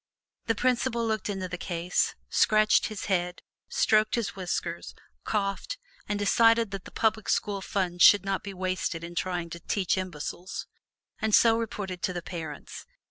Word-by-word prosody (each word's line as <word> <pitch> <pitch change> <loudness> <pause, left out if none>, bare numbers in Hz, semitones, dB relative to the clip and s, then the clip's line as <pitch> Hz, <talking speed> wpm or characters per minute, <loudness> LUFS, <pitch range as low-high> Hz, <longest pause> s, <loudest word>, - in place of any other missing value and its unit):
The 225 - +2
principal 240 0 +1
looked 220 -2 -1
into 190 -2 -3
the 180 0 -6
case, 175 -1 0
scratched 215 0 +4
his 215 -2 -6
head, 180 -2 -1 0.3
stroked 215 0 +3
his 235 -3 -2
whiskers, 175 -2 -4 0.3
coughed, 205 - -1 0.3
and 205 - 0
decided 225 +1 +4
that 195 -1 -6
the - - -10
public 220 -1 0
school 200 -1 0
funds 180 -3 -2
should 200 0 +8
not 195 -1 -1
be 200 - -6
wasted 185 -2 -2
in 170 +1 -7
trying 175 -1 -2
to 170 - -6
"teach 190 +1 0
imbeciles," 180 +1 -5 0.5
and 220 -1 +3
so 225 -1 +6
reported 205 -5 -4
to 185 - -1
the 175 -1 -4
parents. 170 - -7
195 Hz, 160 wpm, -28 LUFS, 180-215 Hz, 0.5 s, should